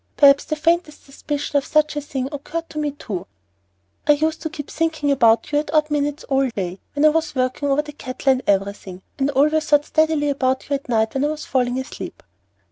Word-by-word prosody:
Perhaps 280 Hz, -1 st, +6 dB
the 310 Hz, -, -2 dB
faintest 325 Hz, 0 st, 0 dB
suspicion 290 Hz, +1 st, -3 dB
of 280 Hz, -, +1 dB
such 305 Hz, 0 st, +2 dB
a 295 Hz, -, -2 dB
thing 270 Hz, -2 st, -3 dB
occurred 325 Hz, +3 st, -5 dB
to 305 Hz, -, -4 dB
me 300 Hz, -1 st, 0 dB
too." 205 Hz, -10 st, -6 dB, 0.8 s
"I 295 Hz, -, +7 dB
used 315 Hz, +2 st, -1 dB
to 315 Hz, -, -3 dB
keep 295 Hz, -2 st, -8 dB
thinking 320 Hz, -3 st, 0 dB
about 230 Hz, -1 st, +3 dB
you 290 Hz, -, +3 dB
at 295 Hz, -1 st, -4 dB
odd 305 Hz, 0 st, +3 dB
minutes 290 Hz, 0 st, -1 dB
all 270 Hz, -1 st, +1 dB
day, 190 Hz, -4 st, -4 dB, 0.2 s
when 290 Hz, +1 st, +3 dB
I -, -, +8 dB
was 315 Hz, -1 st, -1 dB
working 255 Hz, +2 st, 0 dB
over 280 Hz, +2 st, +2 dB
the 300 Hz, -, -9 dB
cattle 270 Hz, -1 st, -1 dB
and 260 Hz, -1 st, +1 dB
everything, 195 Hz, -2 st, -1 dB, 0.2 s
and 270 Hz, +1 st, +2 dB
I -, -, -3 dB
always 300 Hz, +3 st, +2 dB
thought 295 Hz, 0 st, +4 dB
steadily 315 Hz, -2 st, +2 dB
about 265 Hz, -2 st, 0 dB
you 285 Hz, -, -2 dB
at 275 Hz, -2 st, -3 dB
night 220 Hz, -2 st, +1 dB
when 270 Hz, -, 0 dB
I -, -, +2 dB
was 305 Hz, 0 st, -4 dB
falling 250 Hz, -1 st, 0 dB
asleep." 260 Hz, +1 st, -7 dB
285 Hz, 220 wpm, -21 LUFS, 260-300 Hz, 0.8 s, I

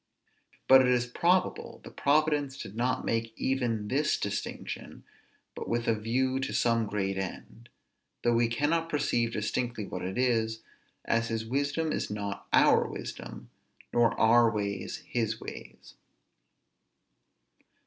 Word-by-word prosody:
But 130 Hz, 0 st, +9 dB
it 130 Hz, -, +3 dB
is 125 Hz, -1 st, +2 dB
probable 175 Hz, +9 st, 0 dB
that -, -, -12 dB
Providence 145 Hz, -2 st, +2 dB
did 100 Hz, -, -8 dB
not 125 Hz, +2 st, 0 dB
make 115 Hz, 0 st, -1 dB
even 120 Hz, -5 st, -1 dB
this 145 Hz, +6 st, +1 dB
distinction, 100 Hz, 0 st, -5 dB, 0.5 s
but -, -, -6 dB
with 120 Hz, 0 st, -1 dB
a 115 Hz, -, +4 dB
view 130 Hz, +5 st, 0 dB
to 130 Hz, -, -3 dB
some 115 Hz, -2 st, +2 dB
great 95 Hz, -2 st, -2 dB
end; 115 Hz, +5 st, -7 dB, 0.5 s
though 120 Hz, -, +3 dB
we 115 Hz, 0 st, +3 dB
cannot 155 Hz, +7 st, 0 dB
perceive 120 Hz, -6 st, 0 dB
distinctly 110 Hz, +1 st, -2 dB
what 90 Hz, -, -6 dB
it 95 Hz, +4 st, -4 dB
is, 110 Hz, -3 st, +1 dB, 0.4 s
as 115 Hz, 0 st, +1 dB
his 115 Hz, -1 st, -2 dB
wisdom 145 Hz, +6 st, -1 dB
is -, -, -2 dB
not 100 Hz, -1 st, -5 dB
our -, -, +5 dB
wisdom, -, -, -8 dB, 0.4 s
nor 120 Hz, -1 st, +3 dB
our 115 Hz, +1 st, +6 dB
ways 100 Hz, -3 st, -3 dB
his 115 Hz, -2 st, -1 dB
ways. -, -, -10 dB
115 Hz, 135 wpm, -29 LUFS, 110-130 Hz, 0.5 s, But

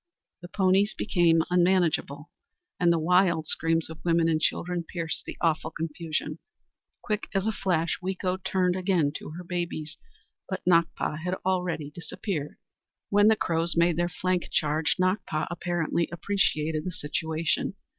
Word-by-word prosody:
The 175 Hz, -, -8 dB
ponies 195 Hz, +2 st, +2 dB
became 170 Hz, -5 st, +3 dB
unmanageable, 175 Hz, -4 st, +2 dB, 0.5 s
and 175 Hz, -1 st, +4 dB
the 170 Hz, -, +3 dB
wild 170 Hz, 0 st, +3 dB
screams 165 Hz, +1 st, 0 dB
of 160 Hz, 0 st, -11 dB
women 170 Hz, -1 st, +3 dB
and 160 Hz, -1 st, +1 dB
children 175 Hz, +2 st, 0 dB
pierced 165 Hz, -1 st, -4 dB
the -, -, -7 dB
awful 160 Hz, -1 st, +1 dB
confusion. 160 Hz, -1 st, -4 dB, 0.6 s
Quick 215 Hz, -3 st, -2 dB
as 195 Hz, 0 st, +1 dB
a 220 Hz, -, +2 dB
flash, 175 Hz, -5 st, 0 dB
Weeko 185 Hz, 0 st, -2 dB
turned 185 Hz, -2 st, +1 dB
again 180 Hz, -6 st, +1 dB
to -, -, -9 dB
her 180 Hz, -, -7 dB
babies, 170 Hz, -3 st, -4 dB, 0.5 s
but 190 Hz, -, -4 dB
Nakpa 170 Hz, -3 st, +2 dB
had 180 Hz, +3 st, -2 dB
already 180 Hz, -5 st, -1 dB
disappeared! 165 Hz, -1 st, -5 dB, 0.5 s
When 205 Hz, +1 st, +5 dB
the 220 Hz, -, +6 dB
Crows 170 Hz, -3 st, 0 dB
made 170 Hz, 0 st, +4 dB
their 175 Hz, +1 st, 0 dB
flank 180 Hz, +1 st, -1 dB
charge, 155 Hz, +1 st, +1 dB
Nakpa 185 Hz, -4 st, 0 dB
apparently 175 Hz, -1 st, -1 dB
appreciated 160 Hz, -4 st, 0 dB
the 180 Hz, -, -3 dB
situation. 160 Hz, +3 st, -2 dB
170 Hz, 145 wpm, -27 LUFS, 160-185 Hz, 0.6 s, the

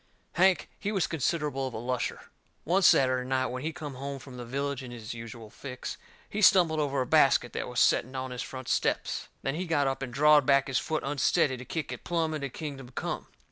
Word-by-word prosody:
Hank, 185 Hz, +2 st, +3 dB
he 205 Hz, -, -2 dB
was 195 Hz, -5 st, +1 dB
considerable 150 Hz, -3 st, -1 dB
of 130 Hz, -, -7 dB
a -, -, -3 dB
lusher. 125 Hz, +2 st, -3 dB, 0.3 s
One 180 Hz, +5 st, +2 dB
Saturday 130 Hz, -6 st, +4 dB
night, 130 Hz, 0 st, +1 dB
when 125 Hz, 0 st, -4 dB
he 155 Hz, +3 st, -2 dB
come 150 Hz, -3 st, -7 dB
home 140 Hz, +2 st, -5 dB
from 130 Hz, -1 st, -11 dB
the 125 Hz, -, -6 dB
village 140 Hz, +2 st, -2 dB
in 130 Hz, -, -8 dB
his 115 Hz, -2 st, -7 dB
usual 115 Hz, -1 st, -9 dB
fix, 130 Hz, 0 st, -6 dB, 0.3 s
he 210 Hz, -, -3 dB
stumbled 175 Hz, -5 st, +5 dB
over 140 Hz, -2 st, 0 dB
a -, -, 0 dB
basket 135 Hz, -4 st, +4 dB
that -, -, -3 dB
was 125 Hz, 0 st, -2 dB
setting 130 Hz, +3 st, +3 dB
on 130 Hz, 0 st, -4 dB
his 125 Hz, -1 st, -4 dB
front 130 Hz, -1 st, -7 dB
steps. -, -, 0 dB, 0.2 s
Then 135 Hz, -, -1 dB
he 175 Hz, +4 st, -3 dB
got 145 Hz, -4 st, +2 dB
up 135 Hz, 0 st, -1 dB
and 130 Hz, -2 st, -4 dB
drawed 150 Hz, +2 st, +5 dB
back 140 Hz, 0 st, +4 dB
his 135 Hz, -1 st, 0 dB
foot 155 Hz, -1 st, -2 dB
unsteady 145 Hz, 0 st, +2 dB
to 130 Hz, 0 st, -9 dB
kick 160 Hz, +2 st, -4 dB
it -, -, -7 dB
plumb 165 Hz, -2 st, 0 dB
into 140 Hz, -3 st, -3 dB
kingdom 135 Hz, -2 st, -7 dB
come. 125 Hz, -, -4 dB
135 Hz, 220 wpm, -29 LUFS, 125-155 Hz, 0.3 s, stumbled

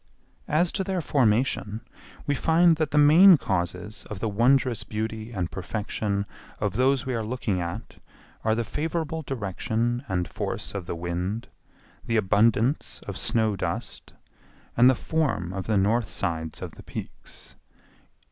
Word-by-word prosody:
As 165 Hz, +3 st, +2 dB
to 190 Hz, -, -1 dB
their 190 Hz, -1 st, -2 dB
formation, 115 Hz, -6 st, +1 dB, 0.4 s
we 145 Hz, -, +1 dB
find 165 Hz, +3 st, +4 dB
that 155 Hz, -2 st, 0 dB
the 150 Hz, -, -1 dB
main 165 Hz, +5 st, +8 dB
causes 95 Hz, -1 st, -3 dB
of 105 Hz, -, -6 dB
the 110 Hz, -, -1 dB
wondrous 120 Hz, +2 st, +2 dB
beauty 110 Hz, +1 st, -4 dB
and 90 Hz, -6 st, -3 dB
perfection 100 Hz, +1 st, -2 dB, 0.3 s
of 105 Hz, -3 st, -1 dB
those 130 Hz, +2 st, +2 dB
we 130 Hz, -, -2 dB
are 115 Hz, -2 st, -1 dB
looking 110 Hz, -5 st, -2 dB
at 85 Hz, +6 st, -6 dB, 0.4 s
are 110 Hz, 0 st, +2 dB
the 120 Hz, -, 0 dB
favorable 160 Hz, +4 st, -3 dB
direction 120 Hz, -, -2 dB
and 90 Hz, -2 st, -1 dB
force -, -, -4 dB
of 95 Hz, -3 st, -5 dB
the -, -, -3 dB
wind, 90 Hz, +6 st, -3 dB, 0.5 s
the 115 Hz, -, 0 dB
abundance 110 Hz, +6 st, +2 dB
of -, -, -5 dB
snow 110 Hz, -2 st, +1 dB
dust, -, -, -5 dB, 0.6 s
and 125 Hz, +2 st, +7 dB
the 130 Hz, -, +4 dB
form 125 Hz, -, -1 dB
of 95 Hz, -1 st, -5 dB
the 110 Hz, -2 st, +2 dB
north 105 Hz, +4 st, +2 dB
sides 80 Hz, -1 st, -3 dB
of -, -, -6 dB
the -, -, -13 dB
peaks. -, -, -9 dB
110 Hz, 150 wpm, -26 LUFS, 100-135 Hz, 0.6 s, main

